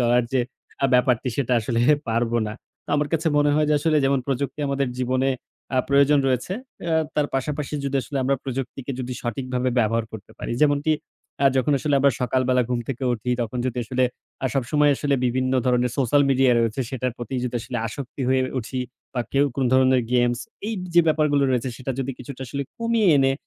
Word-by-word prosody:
চলার 120 0 +3
যে 130 - +3 0.5
ব্যাপারটি, 125 0 +3
সেটা 130 -3 0
আসলে 115 +1 -1 0.3
পারব 115 +1 0
না। 105 - -4 0.3
তো - - -43
আমার 145 0 0
কাছে 160 0 +1
মনে 145 0 +4
হয় 150 0 +2
যে, 150 - +3
আসলে 155 +1 +2
যেমন 135 -1 +2
প্রযুক্তি 135 +1 -2
আমাদের 140 -1 0
জীবনে 130 +1 +1 0.5
আ - - +5
প্রয়োজন 140 +1 +5
রয়েছে, 130 +6 0 0.6
তার 150 -1 +2
পাশাপাশি 150 +2 -2
যদি 140 0 0
আসলে 140 +1 -4
আমরা 135 +2 +1
প্রযুক্তিকে 135 0 -4 0.3
সঠিকভাবে 125 +1 -2
ব্যবহার 115 0 +2
করতে 105 -3 -10
পারি। - - -4
যেমনটি 145 +1 +3 0.5
আ - - +8
যখন 130 +3 +2
আসলে 145 +2 0
আমরা 140 -1 +4
সকালবেলা 125 0 +2
ঘুম 125 -1 0
থেকে 135 0 -3
উঠি, 120 +1 -3
তখন 115 +2 -4
যদি 125 -1 -2
আসলে 130 +2 +1 0.4
আ - - +4
সবসময় 145 +3 +3 0.3
বিভিন্ন 130 +1 0
ধরনের 125 -1 +2
সোশ্যাল 140 +2 +4
মিডিয়ার 130 -2 +4
রয়েছে 115 +2 0
সেটার 130 -2 -2
প্রতি 120 +2 -6
যদি 125 0 -3
আসলে 120 +2 -5
আসক্ত 125 +3 -7
হয়ে 130 0 +3 0.2
উঠি, 125 +2 -4 0.3
বা 125 - 0
কেউ 140 +1 +4
কোনো 135 -2 0
ধরনের 130 -1 +4
গেমস 120 -1 +2 0.3
এই 225 - -2 0.2
যে 175 - +8
ব্যাপারগুলো 150 -2 +3
রয়েছে, 125 0 0
সেটা 130 0 -4
যদি 135 0 -2
কিছুটা 140 -2 -9
আসলে 140 +3 -3 0.2
কমিয়ে 230 -3 +2
এনে, 135 -1 +3
130 Hz, 185 wpm, -23 LUFS, 125-140 Hz, 0.6 s, আ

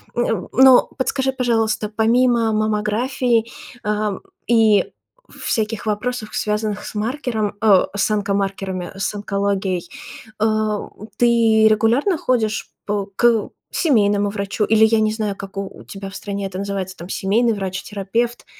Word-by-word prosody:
Э, 240 - +1 0.3
но 260 +1 +6
подскажи, 265 0 0
пожалуйста, 225 -4 0
помимо 230 +1 +2
маммографии, 220 +3 0 0.4
а, 210 -1 -1 0.3
и 225 -3 +3 0.5
всяких 220 -1 -2
вопросов, 215 +1 -3
связанных 210 -1 -2
с - - -8
маркером, 220 -2 -2
э, 205 -4 +5
с 200 +1 +1
онокомаркерами, 195 -3 -2
с 205 +2 -2
онкологией, 200 -3 -2 0.5
э, 215 - +2 0.7
ты 230 -2 +4
регулярно 235 - +2
ходишь 225 -6 -1 0.2
по 205 -1 -2
к 235 -2 +3 0.2
семейному 205 - +2
врачу, 200 +1 -2
или 220 +1 +4
я 220 0 +3
не 215 0 +1
знаю, 215 -2 -2
как 195 0 -9
у 195 -1 -6
тебя 195 -1 -8
в 195 - -11
стране 200 0 -4
это 190 -1 -5
называется 195 -2 -4
там, 170 - -9
семейный 225 +5 +1
врач, 190 -2 -4
терапевт? 225 +4 -2
215 Hz, 130 wpm, -20 LUFS, 200-230 Hz, 0.7 s, но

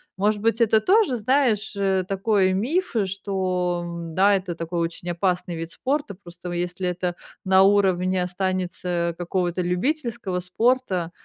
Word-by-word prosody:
Может 205 +2 +1
быть, 230 +1 +1
это 220 -1 +5
тоже, 380 - +3
знаешь, 225 -3 +1
э, 195 -2 +1
такой 195 -1 +2
миф 280 - 0
что, 185 -2 -1
м, 170 -1 -6
да, 200 +4 +4
это 185 -2 -2
такой 170 +1 -4
очень 170 +1 -3
опасный 175 0 -1
вид 165 0 -6
спорта. 275 - -2
Просто, 180 -2 -10
если 175 +1 -2
это 180 0 -2 0.3
на 190 0 +6
уровне 190 -2 +3
останется 180 -2 -2
какого-то 175 0 -1
любительского 220 - -1
спорта, 185 -2 0
185 Hz, 140 wpm, -24 LUFS, 175-210 Hz, 0.3 s, на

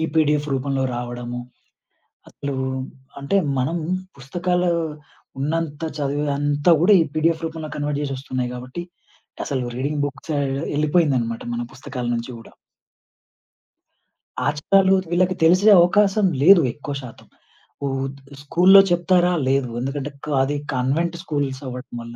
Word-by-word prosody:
PDF 150 -1 +2
రూపంలో 135 0 -1
రావడము, 120 0 -5 0.9
అసలు 140 -1 -5 0.7
అంటే 140 +8 0 0.2
మనం 150 +7 0 0.4
పుస్తకాలు 175 +6 -1 0.7
ఉన్నంత 155 0 -2 0.2
చదువుంతా 145 +2 +1
కూడా 200 +4 +5
ఈ - - 0
పిడిఎఫ్ 160 +1 +1
రూపంలో 160 -1 -6
కన్వర్ట్ 145 0 -2
జేసొస్తున్నాయి 130 -3 -3
కాబట్టి 125 +7 -7 0.6
అసలు 130 -3 -2
రీడింగ్ 145 +3 -1
బుక్సె 145 +2 -4 0.4
ఎళ్ళిపోయిందన్నమాట 145 -7 +1
మన 120 - -2
పుస్తకాల 130 -2 -6
నుంచి 115 +2 -5
గూడా. 115 - -14 1.9
ఆచారాలు 190 +6 +3 0.2
వీళ్ళకి 185 +1 +2
తెలిసే 185 +6 +5
అవకాశం 200 +3 +4 0.2
లేదు 180 +4 +8
ఎక్కువ 145 +1 -6
శాతం. 125 -4 -12 0.6
ఉత్ 135 +1 -3 0.2
స్కూలులో 185 +7 +6
చెప్తారా? 175 0 +3
లేదు. 135 -1 +1
ఎందుకంటే, 135 +3 -3
క - - -12 0.2
అది 145 +2 -1 0.2
కన్వెంట్ 145 +7 0
స్కూల్స్ 140 -6 -2
అవ్వడం 125 0 -8
వల్ల. 115 0 -9
145 Hz, 115 wpm, -22 LUFS, 135-170 Hz, 1.9 s, లేదు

